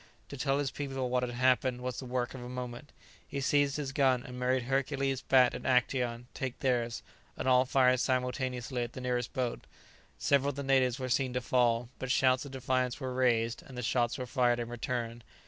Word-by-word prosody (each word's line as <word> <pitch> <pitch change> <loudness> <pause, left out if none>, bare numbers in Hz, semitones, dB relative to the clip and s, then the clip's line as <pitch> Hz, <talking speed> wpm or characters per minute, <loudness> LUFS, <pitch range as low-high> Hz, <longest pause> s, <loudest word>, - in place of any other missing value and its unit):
To - - -6
tell 135 0 0
his 140 -2 -1
people 135 -3 -3
what 125 0 +2
had 125 -1 -3
happened 130 0 +2
was 125 -1 -4
the 130 - -7
work 125 -1 -2
of 130 - -8
a 120 - -7
moment. 125 +2 -6 0.4
He 140 - -4
seized 140 +1 +2
his 140 -3 -3
gun, 130 -3 +2
and 125 0 -8
made 125 0 +1
Hercules, 135 +1 0
Bat, 130 -2 +4
and - - -6
Actæon 125 -2 +1
take 130 -2 -4
theirs, 120 -4 0 0.3
and - - -3
all 130 0 +5
fired 130 -1 +4
simultaneously 125 0 -1
at 120 0 -4
the 130 - -7
nearest 125 -2 -1
boat. 125 -2 -2 0.5
Several 140 0 +2
of 145 - -4
the 140 - -4
natives 130 -2 +3
were 130 - -3
seen 130 0 +1
to 125 - -1
fall; 120 -1 +2
but 130 - -4
shouts 130 0 +3
of 140 - -9
defiance 130 -1 -1
were 130 -2 -4
raised, 120 -3 +1
and 125 -3 -7
shots 120 -1 +1
were 130 - -4
fired 120 -1 +2
in 120 -1 -4
return. 120 -1 -3
125 Hz, 205 wpm, -31 LUFS, 125-130 Hz, 0.5 s, all